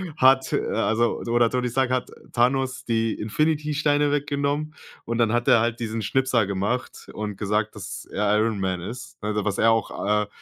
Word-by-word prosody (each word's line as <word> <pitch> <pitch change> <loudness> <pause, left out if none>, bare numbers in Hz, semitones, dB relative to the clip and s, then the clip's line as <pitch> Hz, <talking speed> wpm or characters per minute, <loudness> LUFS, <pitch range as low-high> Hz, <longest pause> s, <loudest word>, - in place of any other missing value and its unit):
hat, 130 -2 +4
äh, - - +1
also 115 +2 +1
oder 120 0 +3
Tony 125 0 -1
Stark 130 +1 +1
hat 130 -1 -1 0.2
Thanos 130 +1 +1
die 115 -1 +1
Infinity 150 +7 0
Steine 145 0 +2
weggenommen 145 +1 -1 0.3
und 115 0 -3
dann 115 -2 +2
hat 120 +2 +1
er 125 -3 +7
halt 115 +1 -1
diesen 110 -1 -3
Schnipser 125 -1 +1
gemacht 100 +6 -3
und 105 -1 -4
gesagt, 105 +1 -1
dass 100 0 -7
er 105 0 +1
Iron 110 0 +1
Man 95 -1 -1
ist, 120 +8 -8
ne? 105 - -4
Also, 105 -1 -1
was 100 -1 -1
er 115 - +4
auch, 105 -2 0
äh, - - -9
115 Hz, 190 wpm, -24 LUFS, 105-130 Hz, 0.3 s, er